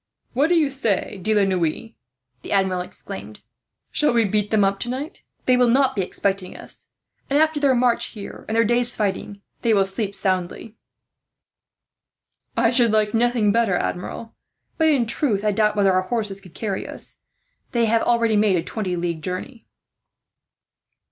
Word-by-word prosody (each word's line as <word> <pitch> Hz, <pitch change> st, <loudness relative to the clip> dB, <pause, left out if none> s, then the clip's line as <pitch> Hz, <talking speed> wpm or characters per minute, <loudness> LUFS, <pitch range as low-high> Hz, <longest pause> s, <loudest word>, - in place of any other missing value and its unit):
"What 275 Hz, +5 st, +3 dB
do 350 Hz, -, +3 dB
you 305 Hz, -4 st, +2 dB
say, 220 Hz, -6 st, -1 dB
De 215 Hz, +3 st, +1 dB
la 205 Hz, -, +4 dB
Noue," 185 Hz, +2 st, -1 dB, 0.5 s
the -, -, -9 dB
Admiral 190 Hz, -2 st, +1 dB
exclaimed; 105 Hz, -, -8 dB, 0.5 s
"shall 300 Hz, -4 st, +3 dB
we 230 Hz, -2 st, +3 dB
beat 210 Hz, +1 st, 0 dB
them 215 Hz, -2 st, +3 dB
up 195 Hz, 0 st, +1 dB
tonight? 260 Hz, +6 st, -5 dB, 0.2 s
They 255 Hz, -, +4 dB
will 250 Hz, 0 st, +4 dB
not 265 Hz, +2 st, +3 dB
be 200 Hz, -, 0 dB
expecting 190 Hz, 0 st, -2 dB
us -, -, -1 dB, 0.4 s
and, 280 Hz, -, +2 dB
after 315 Hz, 0 st, +2 dB
their 275 Hz, -3 st, +3 dB
march 240 Hz, -1 st, +2 dB
here 205 Hz, -3 st, -9 dB
and 220 Hz, -, -1 dB
their 230 Hz, -, +5 dB
day's 240 Hz, +2 st, +1 dB
fighting, 200 Hz, -1 st, -3 dB, 0.2 s
they 225 Hz, -2 st, +3 dB
will 195 Hz, -1 st, +3 dB
sleep 195 Hz, +1 st, -3 dB
soundly." 185 Hz, +3 st, -2 dB, 1.8 s
"I 230 Hz, 0 st, +3 dB
should 240 Hz, -2 st, +4 dB
like 215 Hz, -1 st, +1 dB
nothing 230 Hz, -2 st, +2 dB
better, 225 Hz, -4 st, +2 dB
Admiral; 185 Hz, +6 st, -4 dB, 0.5 s
but 320 Hz, -, +4 dB
in 280 Hz, -6 st, +3 dB
truth, 220 Hz, -3 st, 0 dB
I 210 Hz, -, +3 dB
doubt 210 Hz, +1 st, +1 dB
whether 200 Hz, -2 st, +3 dB
our 185 Hz, -, +3 dB
horses 200 Hz, -1 st, -3 dB
could 180 Hz, -4 st, -16 dB
carry 200 Hz, -4 st, -3 dB
us. -, -, -1 dB, 0.5 s
They 235 Hz, -1 st, +2 dB
have 225 Hz, +1 st, +2 dB
already 235 Hz, -2 st, +2 dB
made 205 Hz, -2 st, +3 dB
a 165 Hz, -, 0 dB
twenty 195 Hz, -5 st, -3 dB
league 170 Hz, -2 st, -3 dB
journey." 185 Hz, +8 st, -6 dB
215 Hz, 170 wpm, -22 LUFS, 195-240 Hz, 1.8 s, their